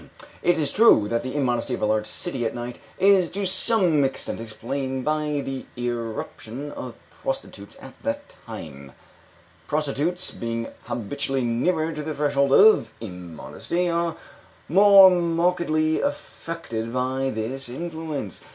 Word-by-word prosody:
It 175 Hz, -1 st, +3 dB
is 150 Hz, -3 st, 0 dB
true 205 Hz, -, +6 dB
that 115 Hz, 0 st, 0 dB
the 130 Hz, +2 st, -5 dB
immodesty 125 Hz, -5 st, 0 dB
of -, -, -9 dB
a -, -, +4 dB
large 110 Hz, 0 st, +1 dB
city 135 Hz, -9 st, -3 dB
at 115 Hz, -, -2 dB
night 120 Hz, 0 st, -6 dB, 0.2 s
is 190 Hz, -3 st, +4 dB
to 200 Hz, +2 st, -3 dB
some 185 Hz, -5 st, +3 dB
extent 135 Hz, -3 st, -2 dB
explained 130 Hz, +4 st, -4 dB
by 150 Hz, -1 st, 0 dB
the 135 Hz, -1 st, -5 dB
irruption 120 Hz, +2 st, -5 dB
of -, -, -7 dB, 0.2 s
prostitutes -, -, -6 dB
at -, -, -11 dB
that 285 Hz, +1 st, -4 dB
time; 70 Hz, -, -9 dB, 0.7 s
prostitutes, 155 Hz, +4 st, -1 dB
being 115 Hz, 0 st, -4 dB, 0.2 s
habitually 130 Hz, +3 st, -2 dB
nearer 155 Hz, +8 st, 0 dB
to 150 Hz, -, -5 dB
the 155 Hz, 0 st, -4 dB
threshold 140 Hz, -1 st, +1 dB
of 215 Hz, +9 st, +6 dB
immodesty, 90 Hz, -, -4 dB
are 170 Hz, -1 st, 0 dB, 0.5 s
more 195 Hz, +2 st, +8 dB
markedly 170 Hz, -2 st, +1 dB
affected 165 Hz, -, -4 dB
by 130 Hz, +2 st, -1 dB
this 120 Hz, +3 st, -4 dB
influence. 160 Hz, -, -5 dB
140 Hz, 135 wpm, -24 LUFS, 120-170 Hz, 0.7 s, more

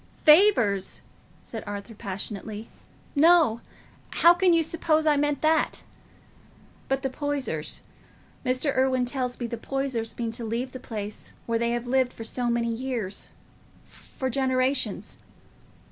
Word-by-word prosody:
"Favours!" 300 Hz, -, +5 dB, 0.4 s
said 225 Hz, -, -6 dB
Arthur, 205 Hz, +2 st, -6 dB
passionately; 210 Hz, +1 st, -6 dB, 0.5 s
"no; 310 Hz, -6 st, +5 dB, 0.5 s
how 340 Hz, +1 st, +6 dB
can 360 Hz, +1 st, +3 dB
you 335 Hz, -1 st, +4 dB
suppose 315 Hz, -1 st, +1 dB
I 300 Hz, -1 st, +4 dB
meant 295 Hz, 0 st, 0 dB
that? 315 Hz, 0 st, +2 dB, 1.1 s
But 270 Hz, +1 st, 0 dB
the 270 Hz, -, 0 dB
Poysers—Mr. 260 Hz, -, -3 dB
Irwine 260 Hz, -1 st, +2 dB
tells 250 Hz, -1 st, -2 dB
me 240 Hz, -, -2 dB
the 235 Hz, 0 st, -4 dB
Poysers 260 Hz, -4 st, -2 dB
mean 230 Hz, -1 st, -2 dB
to 230 Hz, +1 st, -4 dB
leave 235 Hz, +3 st, -2 dB
the 255 Hz, -, -7 dB
place 215 Hz, -4 st, -6 dB
where 230 Hz, -1 st, 0 dB
they 235 Hz, 0 st, +1 dB
have 240 Hz, 0 st, -2 dB
lived 255 Hz, -1 st, +1 dB
so 245 Hz, +1 st, -2 dB
many 235 Hz, -1 st, 0 dB
years—for 250 Hz, +2 st, -6 dB
generations. 260 Hz, +1 st, 0 dB
255 Hz, 125 wpm, -26 LUFS, 230-280 Hz, 1.1 s, how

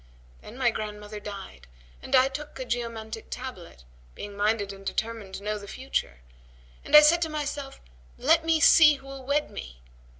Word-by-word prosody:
Then 225 Hz, -, -12 dB
my 250 Hz, -3 st, +2 dB
grandmother 210 Hz, -1 st, -6 dB
died 195 Hz, -, -9 dB, 0.3 s
and 270 Hz, -, 0 dB
I 260 Hz, 0 st, +6 dB
took 295 Hz, +2 st, -7 dB
a 260 Hz, -, -5 dB
geomantic 230 Hz, -2 st, -4 dB
tablet, 190 Hz, -, -8 dB, 0.3 s
being 205 Hz, 0 st, -8 dB
minded 205 Hz, -1 st, 0 dB
and 195 Hz, 0 st, -13 dB
determined 215 Hz, -1 st, -4 dB
to 195 Hz, -, -8 dB
know 210 Hz, 0 st, -2 dB
the 200 Hz, -, -11 dB
future, 135 Hz, -, -4 dB, 0.6 s
and -, -, +2 dB
I 300 Hz, -, +12 dB
said 330 Hz, +3 st, +5 dB
to 325 Hz, -, 0 dB
myself, 290 Hz, -2 st, -5 dB, 0.4 s
'Let 320 Hz, +5 st, +3 dB
me 325 Hz, -1 st, +2 dB
see 310 Hz, -1 st, +7 dB
who 270 Hz, -, -14 dB
will 270 Hz, -1 st, -9 dB
wed 285 Hz, +3 st, 0 dB
me!' -, -, -9 dB
230 Hz, 175 wpm, -27 LUFS, 205-280 Hz, 0.6 s, I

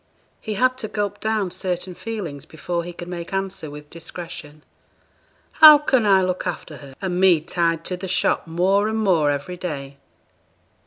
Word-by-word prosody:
He 215 Hz, -2 st, -4 dB
had 255 Hz, +4 st, +2 dB
to 215 Hz, -, -3 dB
gulp 205 Hz, -1 st, -3 dB
down 215 Hz, -4 st, -1 dB
certain 185 Hz, 0 st, -3 dB
feelings 180 Hz, -9 st, -6 dB
before 170 Hz, +2 st, -4 dB
he 175 Hz, -, -7 dB
could 175 Hz, 0 st, -9 dB
make 170 Hz, -1 st, -6 dB
answer 195 Hz, -4 st, -4 dB
with 150 Hz, 0 st, -11 dB
discretion. 165 Hz, -3 st, -9 dB, 0.9 s
'How 310 Hz, -1 st, +10 dB
can 260 Hz, -6 st, +1 dB
I 190 Hz, -2 st, +5 dB
look 185 Hz, 0 st, -2 dB
after 160 Hz, -3 st, -5 dB
her, 135 Hz, -2 st, -13 dB
and 180 Hz, -1 st, -1 dB
me 185 Hz, -4 st, +6 dB
tied 165 Hz, 0 st, -1 dB
to 180 Hz, -, -3 dB
the 190 Hz, -, -6 dB
shop 180 Hz, -2 st, +1 dB
more 190 Hz, +5 st, +2 dB
and 220 Hz, 0 st, -1 dB
more 180 Hz, -9 st, +2 dB
every 145 Hz, +5 st, -3 dB
day?' 140 Hz, -6 st, -6 dB
180 Hz, 170 wpm, -22 LUFS, 165-200 Hz, 0.9 s, How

